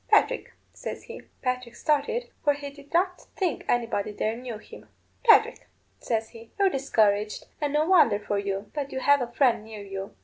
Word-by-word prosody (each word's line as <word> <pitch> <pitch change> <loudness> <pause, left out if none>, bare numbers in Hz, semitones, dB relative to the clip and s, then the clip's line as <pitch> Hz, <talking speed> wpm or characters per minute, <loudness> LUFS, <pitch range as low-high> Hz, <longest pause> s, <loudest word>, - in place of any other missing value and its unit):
'Patrick,' - - +3 0.2
says - - -6
he. - - -9 0.2
Patrick 250 -2 -2
started, 305 - 0
for 290 - +4
he 285 0 -7
did 285 0 -16
not 360 +2 0
think 360 -7 -1
anybody 230 -4 0
there 215 +2 -1
knew 240 -2 -6
him. - - -14 0.3
'Patrick,' 460 -3 +5 0.3
says 225 -2 -1
he, 230 0 -13
'you're 395 -1 +4
discouraged, 210 - +1 0.2
and 290 -1 0
no 300 +1 +3
wonder 320 - +5
for 205 0 -2
you. 200 0 -3
But 285 -2 -3
you 265 - -3
have 285 0 +5
a 245 - -1
friend 240 -4 +3
near 215 -2 -9
you. 195 0 -7
250 Hz, 180 wpm, -27 LUFS, 215-290 Hz, 0.3 s, Patrick